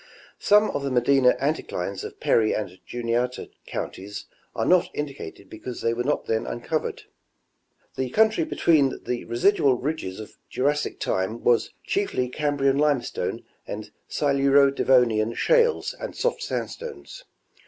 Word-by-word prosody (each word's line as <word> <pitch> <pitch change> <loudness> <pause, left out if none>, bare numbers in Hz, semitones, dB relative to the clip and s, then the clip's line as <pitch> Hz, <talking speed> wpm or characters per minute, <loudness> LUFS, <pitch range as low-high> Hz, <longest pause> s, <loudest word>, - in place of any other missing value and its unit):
Some 210 +1 +4
of - - -2
the 140 - -1
Medina 130 +1 +4
anticlines 100 - -2
of - - -8
Perry 110 -2 +3
and 95 -4 -5
Juniata 120 +1 -2 0.2
counties 100 +2 -6 0.3
are - - 0
not 180 -1 +4
indi 145 -1 -3
cated 100 - -10
because 120 +4 -7
they 115 - +1
were 120 +1 -2
not 150 +3 0
then 110 0 -1
uncovered. 155 +6 -3 0.9
The 130 -1 -2
country 220 - +3
between 155 - +2
the 125 -1 -3
residual 135 +2 +3
ridges 130 -8 -4
of 110 - -11
Jurassic 145 +3 -1
time 95 +5 -2
was 120 -1 +3
chiefly 385 - -1
Cam 145 +2 -1
brian 135 0 +2
limestone 145 -4 0 0.2
and - - -6 0.2
Siluro 140 -1 +4
Devonian 115 -4 +3
shales 475 -2 +2
and - - -6
soft - - -1
sandstones. 480 +1 -6
135 Hz, 140 wpm, -25 LUFS, 115-150 Hz, 0.9 s, Some